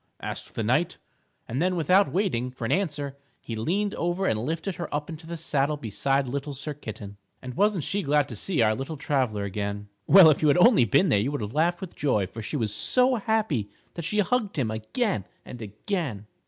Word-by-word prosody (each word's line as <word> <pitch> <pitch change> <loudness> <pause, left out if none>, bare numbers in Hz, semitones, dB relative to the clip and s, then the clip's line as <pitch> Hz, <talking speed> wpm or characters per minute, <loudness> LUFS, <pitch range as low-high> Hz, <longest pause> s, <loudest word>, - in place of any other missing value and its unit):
asked - - -6
the - - -1
knight. - - +1 0.5
And 125 +6 -2
then 180 +1 +1
without 180 +1 +3
waiting 165 - 0
for 125 -2 -6
an - - -1
answer 145 -7 -1 0.2
he 115 - -6
leaned 195 - -1
over 175 +3 -1
and 110 - +1
lifted 165 +6 -3
her 170 - -5
up 145 +2 -3
into 160 +1 -9
the 170 0 -5
saddle 150 -2 0
beside 135 +3 0
Little 140 +2 -4
Sir 150 +3 -3
Kitten. 110 -7 -8 0.2
And 125 -1 -7
wasn't 200 - +2
she 200 +6 -1
glad 145 -3 +2
to 120 - -6
see 140 - 0
our 110 0 +3
little 135 +7 -5
traveler 130 -8 0
again? 100 +1 -4 0.2
Well, 180 -5 +9
if 145 - 0
you 155 - +3
had 145 - +4
only 185 - +6
been 180 - +3
there 115 - +4
you 120 +8 0
would 145 - -3
have 105 +2 -5
laughed 170 +3 +1
with 190 -3 -7
joy, 125 -9 +1
for 110 +5 -8
she 130 +7 -3
was 110 -5 -1
so 250 - +3
happy 205 - 0 0.2
that 170 - -5
she 170 +6 -2
hugged 215 -3 -1
him 120 -6 0
again 110 - -1 0.2
and 125 - -9
again. 110 - -4
145 Hz, 215 wpm, -26 LUFS, 115-180 Hz, 0.5 s, Well